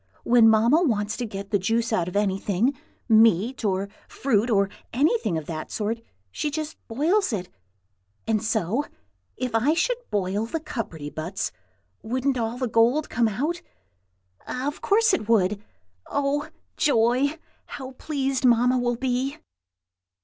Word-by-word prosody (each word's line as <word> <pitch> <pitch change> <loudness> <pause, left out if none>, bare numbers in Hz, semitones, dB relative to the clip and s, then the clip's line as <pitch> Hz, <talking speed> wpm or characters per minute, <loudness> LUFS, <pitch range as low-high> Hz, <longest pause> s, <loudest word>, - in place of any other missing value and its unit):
When 235 -2 +6
Mamma 230 +9 +4
wants 210 -9 0
to 245 - -3
get 200 0 -7
the 205 - +3
juice 225 +4 0
out 175 -6 +1
of 180 - -6
anything, 205 +5 +1 0.3
meat, 225 +2 +4
or 195 -1 0 0.2
fruit, 235 -3 0
or 200 -3 +3 0.2
anything 285 - +1
of 160 - -5
that 155 -1 -5
sort, 225 +2 -2 0.3
she 300 - -2
just 310 +1 -4
boils 325 - +1
it. 185 -5 -3 0.8
And 220 -2 +1
so, 220 - 0 0.5
if 250 -2 -3
I 250 +8 +3
should 485 +8 +1
boil 205 +2 -1
the 325 - -3
cupperty 165 - -5
buts, 180 +7 -3 0.5
wouldn't 255 +3 -1
all 230 +1 -2
the 255 0 -1
gold 235 +7 +2
come 235 0 +2
out? 295 - -2 0.9
Of 275 +4 -3
course 445 +3 +3
it 215 0 -1
would! 205 -2 +2 0.4
Oh, 285 +1 -1 0.3
joy! 270 +2 +2 0.3
how 265 -1 -7
pleased 270 -1 -2
Mamma 250 +1 +4
will 240 0 0
be!" 255 +2 -1
230 Hz, 140 wpm, -25 LUFS, 210-275 Hz, 0.9 s, When